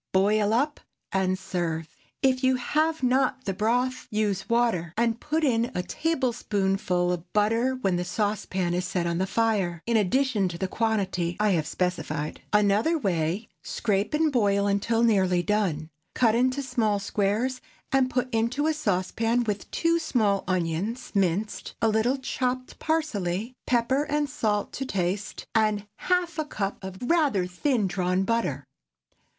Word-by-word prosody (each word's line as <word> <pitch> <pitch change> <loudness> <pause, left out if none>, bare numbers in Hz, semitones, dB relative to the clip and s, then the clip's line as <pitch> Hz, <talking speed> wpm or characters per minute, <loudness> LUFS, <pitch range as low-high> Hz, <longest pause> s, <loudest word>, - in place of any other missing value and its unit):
Boil 205 +2 +3
up 280 +6 +1 0.3
and 185 -1 +1
serve. 175 -4 -3 0.4
If 260 -1 +3
you 260 0 +4
have 310 +4 0
not 260 +1 +2
the 195 - -1
broth, 245 +6 0
use 210 -3 -1
water, 225 -9 +1
and 230 0 +1
put 310 +4 -1
in 235 -4 +2
a 180 - -1
tablespoonful 195 - 0
of 175 0 -5
butter 225 +5 +2
when 195 -8 0
the 175 - -1
saucepan 190 -2 -1
is 180 +1 0
set 180 -2 -1
on 170 0 -1
the 190 - 0
fire, 195 -6 0
in 235 -1 +2
addition 220 0 +2
to 170 -1 -5
the 190 - -1
quantity 190 -5 -1
I 210 -1 +3
have 160 -5 +1
specified. 165 -4 -2
Another 210 +10 +3
Way. 185 - -1
Scrape 205 +3 -1
and 310 0 +2
boil 200 -5 +2
until 205 +3 +1
nearly 190 -6 +3
done. 175 -7 0 0.2
Cut 230 -4 +4
into 255 +4 +1
small 230 -5 +1
squares, 210 +6 -1 0.3
and 265 -1 +3
put 250 0 0
into 235 +6 +1
a 315 - +2
saucepan, 225 -1 0
with 205 -3 -3
two 335 0 +1
small 220 -11 +1
onions, 185 +7 -2
minced; 200 +1 -1
a 225 - +2
little 220 +5 +2
chopped 255 -1 -3
parsley, 230 - -1
pepper 255 +3 +2
and 295 0 0
salt 210 -5 -1
to 270 - -3
taste, 195 -1 -2
and 215 -2 +2
half 355 -3 0
a 310 - 0
cup 200 -8 -4
of 190 0 -6
rather 275 - +2
thin 210 +6 0
drawn 185 0 0
butter. 190 - -1
215 Hz, 155 wpm, -26 LUFS, 185-255 Hz, 0.4 s, you